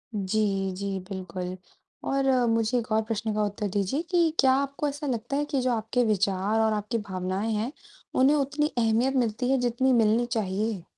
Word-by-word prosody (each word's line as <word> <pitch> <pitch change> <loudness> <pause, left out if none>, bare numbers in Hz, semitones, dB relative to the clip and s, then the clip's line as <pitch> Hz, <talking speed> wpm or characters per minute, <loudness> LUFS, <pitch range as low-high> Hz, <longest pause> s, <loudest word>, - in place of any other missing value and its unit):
जी, 195 -1 0
जी। 195 0 -3
बिल्कुल, 185 -1 -5 0.5
और 275 0 0 0.2
मुझे 230 +1 +1
एक 230 -2 -4
और 220 0 +3
प्रश्न 220 0 -2
का 210 0 +1
उत्तर 205 0 -2
दीजिए 205 +9 0
कि 340 -3 +3
क्या 260 -1 +6
आपको 280 +2 -1
ऐसा 290 +1 -4
लगता 240 +1 -2
है 295 - 0
कि 290 -2 -1
जो 250 0 +1
आपके 235 +2 0
विचार 205 0 +1
और 220 -1 +3
आपकी 210 +3 -2
भावनाएँ 190 +1 -3
हैं, 220 +4 -1 0.4
उन्हें 270 +3 +5
उतनी 295 +1 +1
अहमियत 235 +3 +2
मिलती 245 0 0
है 270 - +4
जितनी 245 +2 +2
मिलनी 230 0 +3
चाहिए? 215 -3 -2
225 Hz, 180 wpm, -27 LUFS, 205-260 Hz, 0.5 s, क्या